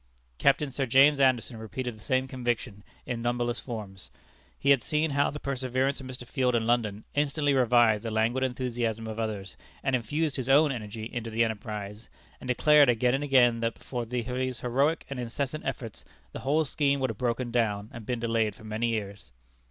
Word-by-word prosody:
Captain 140 0 +3
Sir 135 0 -2
James 140 +4 +6
Anderson 130 -3 +2
repeated 120 +2 -5
the - - -16
same 130 +3 0
conviction 120 -5 -3 0.2
in 120 -1 -3
numberless 120 0 -1
forms. 105 -6 -8 0.5
He 140 - +3
had 135 -3 +5
seen 150 +4 0
how 140 +1 +2
the 150 - -6
presence 130 0 -1
of 130 - -9
Mr. 125 -1 -7
Field 125 -1 0
in 115 -1 +1
London 110 -3 0
instantly 145 0 +1
revived 120 -4 +4
the 115 - -4
languid 110 +4 +1
enthusiasm 120 -3 -2
of 110 0 -5
others, 105 -4 -4 0.3
and 135 - +2
infused 145 +6 -1
his 130 -1 -3
own 145 +2 +5
energy 110 -3 -6
into 115 -1 -5
the 115 +1 +2
enterprise, 105 -1 -5 0.3
and - - -9
declared 145 +2 +5
again 120 +1 +2
and 135 +2 0
again 125 -4 +4
that 115 0 -1
but - - -20
for 120 -2 -3
these 125 +2 -3
heroic 135 +6 +1
and 140 -2 -5
incessant 135 +5 -3
efforts 120 -4 -5 0.3
the - - -7
whole 150 +4 +1
scheme 140 -1 +1
would 130 -3 0
have 105 - -11
broken 120 0 -1
down, 105 -4 0
and 115 -3 -9
been 125 -2 -1
delayed 115 -3 0
for 110 - -16
many 110 +2 -2
years. 100 - -4
120 Hz, 190 wpm, -28 LUFS, 115-135 Hz, 0.5 s, James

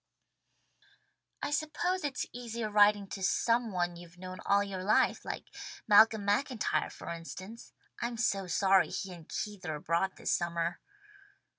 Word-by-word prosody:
"I - - -1
suppose 325 +5 -1
it's 280 -3 -2
easier 235 -2 -4
writing 205 -1 +5
to 195 - -6
some 230 +4 +2
one 175 -2 -1
you've 175 0 -13
known 185 0 -8
all 200 0 +4
your 190 -2 -5
life, 210 +3 +3
like - - -5 0.4
Malcolm 215 0 +6
MacIntyre 210 - +1
for - - -9
instance. 185 +6 -8 0.3
I'm 235 0 -2
so 195 -4 0
sorry 190 +1 +4
he 190 -2 -4
and 165 -3 -13
Keith 205 -3 -4
are 160 -3 -3
abroad 170 +5 0
this - - -2
summer." 170 0 -1
200 Hz, 145 wpm, -31 LUFS, 175-225 Hz, 0.4 s, Malcolm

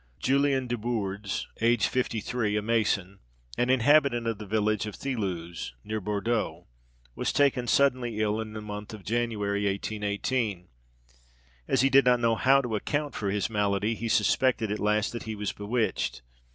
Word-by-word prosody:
Julian 135 0 +2
Desbourdes, 105 -4 -3 0.2
aged 115 -1 +3
fifty 125 -3 -1
three, 110 -4 -1
a - - 0
mason, 105 -4 0 0.4
and 120 +1 0
inhabitant 130 -1 +4
of 115 -2 -2
the 105 - -7
village 110 +1 0
of 105 - -6
Thilouze, 90 - -4
near 110 0 -3
Bourdeaux, 105 +3 -2 0.5
was - - -1
taken 135 -3 +2
suddenly 125 -5 +2
ill, 110 0 +1
in 110 -1 -7
the 110 - -6
month 105 0 -7
of 105 - -13
January 105 -3 -1
1818. 100 0 -2 1.0
As - - +2
he 135 0 +3
did 135 -1 +6
not 125 -1 +4
know 115 -1 +3
how 135 +4 +4
to 115 -3 -2
account 145 +7 -2
for 100 - -2
his 100 +1 0
malady, 105 0 0
he 115 +1 -4
suspected 110 +1 +2
at 105 - -2
last 105 0 +1
that 120 - -5
he 110 - -3
was 105 -1 -2
bewitched. 110 - -2
110 Hz, 165 wpm, -28 LUFS, 105-120 Hz, 1.0 s, did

